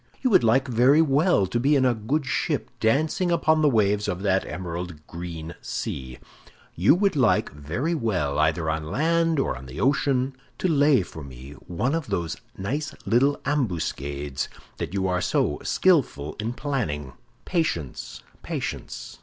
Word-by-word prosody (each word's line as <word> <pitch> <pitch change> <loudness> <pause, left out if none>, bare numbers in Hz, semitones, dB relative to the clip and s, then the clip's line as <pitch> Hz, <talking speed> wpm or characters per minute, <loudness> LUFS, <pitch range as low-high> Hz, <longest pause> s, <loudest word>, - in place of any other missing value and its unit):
You 255 - +2
would 185 - +6
like 130 +5 +3
very 130 +6 +5
well 145 - +3
to 105 +6 -1
be 140 +4 +3
in 130 -2 +3
a 125 - +4
good 130 +7 -1
ship 130 - -1
dancing 155 +10 +1
upon 155 -2 +3
the 150 - +5
waves 105 -3 +2
of 90 +2 -3
that 95 -1 +1
emerald 85 -3 -6
green 85 -1 -7
sea; 65 -1 -5 0.6
you 95 - +4
would 195 -1 +2
like 130 -3 +3
very 80 - -2
well, 90 - 0
either 80 +1 +1
on 80 0 -2
land 165 - +2
or - - 0
on 65 +1 -10
the 65 +5 -8
ocean, 135 -1 +1 0.2
to - - 0
lay 145 - +4
for 80 -3 -9
me 65 0 -10 0.2
one 120 - -1
of 165 -4 -2
those 85 -1 -2 0.2
nice 140 +10 -3
little 125 +8 +3
ambuscades 75 - -2 0.4
you 95 0 -1
are 90 0 0
so 75 -4 +1
skillful 135 - +2
in 110 +3 -2
planning. 100 - -3 0.3
Patience, 155 - -2 0.2
patience! - - -5
110 Hz, 155 wpm, -25 LUFS, -, 0.6 s, would